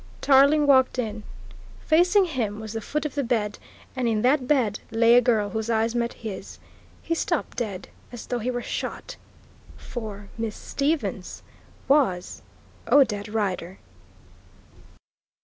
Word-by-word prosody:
Tarling 285 +2 +5
walked 260 -2 +4
in. 220 -3 -3 0.6
Facing 360 +5 +4
him 230 - -3
was 220 -1 -7
the 225 - -4
foot 300 +8 -3
of 300 - -3
the 280 - -1
bed, 220 -4 -1 0.4
and 255 -2 -1
in 220 -1 0
that 255 0 +2
bed 245 -8 +1
lay 230 +1 +4
a 245 - +7
girl 220 -4 +1
whose 220 0 -3
eyes 225 0 +1
met 235 0 -1
his. 200 -3 -6 0.5
He 330 - -1
stopped 330 - -2
dead 200 -6 -4 0.2
as 240 -2 -8
though 245 - -2
he 240 +3 -2
were 245 -1 -3
shot - - -5 0.6
For 210 -4 -8
"Miss 225 -2 -3
Stevens" 290 +3 -3 0.4
was 250 -11 +1 0.5
Odette 215 -8 +4
Rider! 195 -4 -3
235 Hz, 140 wpm, -25 LUFS, 215-275 Hz, 0.6 s, a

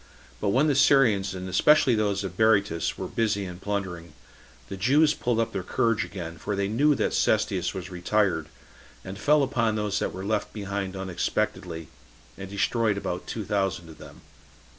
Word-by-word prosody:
But - - 0
when 130 +9 +3
the 150 - +3
Syrians, 110 -9 +4
and 95 0 -6
especially 135 +7 +4
those 105 -2 0
of 95 -2 -5
Berytus, 100 -5 +2
were - - -4
busy 105 -3 -1
in 90 -1 -8
plundering, 95 -5 -4 0.5
the 95 - -6
Jews 145 +10 +3
pulled 120 -5 -1
up 115 - -1
their 95 - -2
courage 110 +4 0
again, 85 -4 -7
for 105 - -3
they 100 0 0
knew 140 +8 +3
that - - -1
Cestius - - +1
was 95 0 -6
retired, 95 +2 0 0.6
and 95 +2 -7
fell 150 +4 +4
upon 115 -5 0
those 105 -1 -1
that - - -2
were 95 +1 -7
left 105 0 -1
behind 100 -2 -4
unexpectedly, 90 -3 -3 0.5
and 95 -1 -8
destroyed 105 +1 0
about 90 -3 -4
two 110 -3 -4
thousand 95 -4 -1
of 80 - -13
them. - - -13
100 Hz, 175 wpm, -26 LUFS, 95-115 Hz, 0.6 s, Syrians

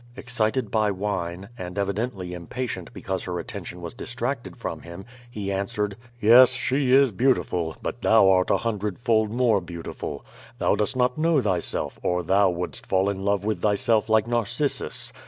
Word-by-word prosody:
'* - - -25
Excited 120 -1 -1
by 110 -2 +2
wine, 95 -1 -3
and 90 +1 -6
evidently 100 -2 -2
impatient 110 +8 -5
because 95 -1 -3
her 90 -1 -3
at - - -7
tention 90 - -7
was 85 -1 -6
distracted 120 +2 -4
from - - -5
him, 85 +3 -10 0.2
he 100 -4 -4
answered: 100 +1 -2 0.2
"Yes, 120 +4 +7
she 130 +1 0
is 135 -1 +6
beautiful, 90 -8 +1
but 120 - -4
thou 110 -3 +5
art 95 -1 +4
a - - +4
hundred 105 -4 -2
fold 110 -3 +2
more 115 -3 +2
beautiful. 85 -1 -7 0.3
Thou - - +2
dost 105 +5 0
not 125 +2 +1
know 165 -1 +3
thyself, 95 -8 -2
or 90 0 0
thou 95 +3 +4
wouldst 90 0 -5
fall 95 +1 +2
in 95 -1 -5
love 100 0 0
with 110 0 -1
thyself 105 +1 +2
like 110 -1 +4
Narcissus. 120 +4 -1
105 Hz, 175 wpm, -25 LUFS, 95-120 Hz, 0.3 s, Yes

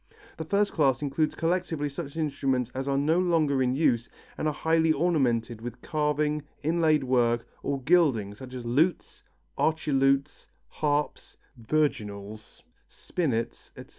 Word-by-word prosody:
The 160 - -5
first 200 +5 +1
class 135 -3 +2
includes 150 +2 0
collectively 165 -3 -1
such 145 +1 -7
instruments 135 -5 -1
as 135 +1 -4
are 135 0 +1
no 155 +5 +2
longer 160 -7 +2
in 125 0 +1
use 120 -6 +1 0.3
and 155 - -2
are - - +2
highly 160 +1 +2
ornamented 130 -9 +1
with 120 0 -7
carving, 150 0 0 0.2
inlaid 155 -2 +2
work 120 -2 +1 0.2
or 140 -2 -3
gilding 135 - +3
such 130 +4 -10
as 125 -2 -6
lutes, 150 +9 0 0.4
archilutes, 140 -2 +1 0.2
harps, 150 -1 -2 0.2
virginals, 110 -6 -3 0.3
spinets, 130 -10 -3
etc. - - -11
145 Hz, 135 wpm, -27 LUFS, 125-160 Hz, 0.4 s, gilding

